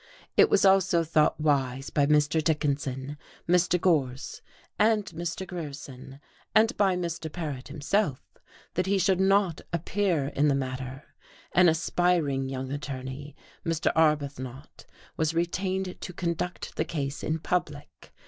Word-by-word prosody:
It 430 Hz, -, +6 dB
was 195 Hz, -, +4 dB
also 190 Hz, -3 st, +4 dB
thought 155 Hz, -1 st, +2 dB
wise 135 Hz, -3 st, 0 dB
by 145 Hz, -1 st, +2 dB
Mr. 150 Hz, +1 st, +3 dB
Dickinson, 145 Hz, -2 st, -1 dB, 0.3 s
Mr. 180 Hz, 0 st, +3 dB
Gorse, 140 Hz, -8 st, 0 dB, 0.4 s
and 215 Hz, -1 st, +3 dB
Mr. 170 Hz, +1 st, -5 dB
Grierson, 140 Hz, -6 st, -8 dB, 0.4 s
and 220 Hz, +1 st, +4 dB
by 195 Hz, -3 st, +3 dB
Mr. 170 Hz, -3 st, -4 dB
Paret 150 Hz, -7 st, -5 dB
himself 150 Hz, -1 st, 0 dB, 0.5 s
that 180 Hz, +1 st, -1 dB
he 200 Hz, +1 st, +2 dB
should 190 Hz, -1 st, +2 dB
not 190 Hz, -3 st, +3 dB
appear 170 Hz, -3 st, 0 dB
in 145 Hz, +1 st, +1 dB
the 140 Hz, -, +3 dB
matter; 130 Hz, +1 st, -4 dB, 0.5 s
an 180 Hz, -1 st, +6 dB
aspiring 160 Hz, -4 st, +1 dB
young 130 Hz, 0 st, -4 dB
attorney, 135 Hz, 0 st, -6 dB, 0.3 s
Mr. 165 Hz, -2 st, +1 dB
Arbuthnot, 145 Hz, -4 st, -1 dB, 0.3 s
was 160 Hz, 0 st, 0 dB
retained 185 Hz, +2 st, -2 dB
to 180 Hz, -, -6 dB
conduct 175 Hz, 0 st, -3 dB
the -, -, +2 dB
case 140 Hz, -3 st, -3 dB
in 155 Hz, -, 0 dB
public. 150 Hz, -3 st, -4 dB
155 Hz, 130 wpm, -27 LUFS, 140-180 Hz, 0.5 s, It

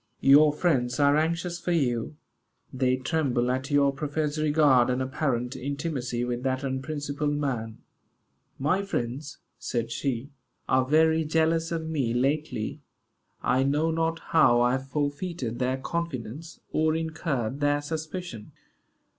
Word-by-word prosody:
Your 145 Hz, +3 st, +7 dB
friends 140 Hz, -5 st, 0 dB
are 145 Hz, 0 st, +5 dB
anxious 170 Hz, +3 st, 0 dB
for 175 Hz, 0 st, -1 dB
you. 125 Hz, -4 st, 0 dB, 0.6 s
They 130 Hz, 0 st, +2 dB
tremble 130 Hz, -3 st, 0 dB
at 130 Hz, +2 st, -2 dB
your 140 Hz, -1 st, +3 dB
professed 150 Hz, +2 st, -2 dB
regard 145 Hz, -5 st, +4 dB
and 125 Hz, 0 st, 0 dB
apparent 130 Hz, -2 st, -1 dB
intimacy 135 Hz, -3 st, -3 dB
with 120 Hz, 0 st, -3 dB
that 130 Hz, +1 st, -1 dB
unprincipled 145 Hz, +2 st, -2 dB
man." 120 Hz, -7 st, -2 dB, 0.8 s
"My 155 Hz, +8 st, +1 dB
friends," 140 Hz, -6 st, -4 dB, 0.2 s
said 115 Hz, -1 st, -2 dB
she, 135 Hz, +2 st, -3 dB, 0.4 s
"are 130 Hz, 0 st, +3 dB
very 160 Hz, +3 st, +3 dB
jealous 160 Hz, +1 st, +1 dB
of 165 Hz, -1 st, -2 dB
me 135 Hz, -7 st, -1 dB
lately. 130 Hz, -3 st, -1 dB, 0.6 s
I 130 Hz, -, +2 dB
know 150 Hz, +4 st, +1 dB
not 165 Hz, 0 st, 0 dB, 0.2 s
how 155 Hz, -7 st, +6 dB
I 120 Hz, 0 st, +4 dB
have 130 Hz, +1 st, -2 dB
forfeited 145 Hz, -3 st, -3 dB
their 130 Hz, +1 st, 0 dB
confidence, 150 Hz, -1 st, -5 dB
or 155 Hz, 0 st, +2 dB
incurred 155 Hz, -6 st, -2 dB
their 145 Hz, 0 st, +2 dB
suspicion." 155 Hz, -, -6 dB
145 Hz, 130 wpm, -27 LUFS, 130-160 Hz, 0.8 s, Your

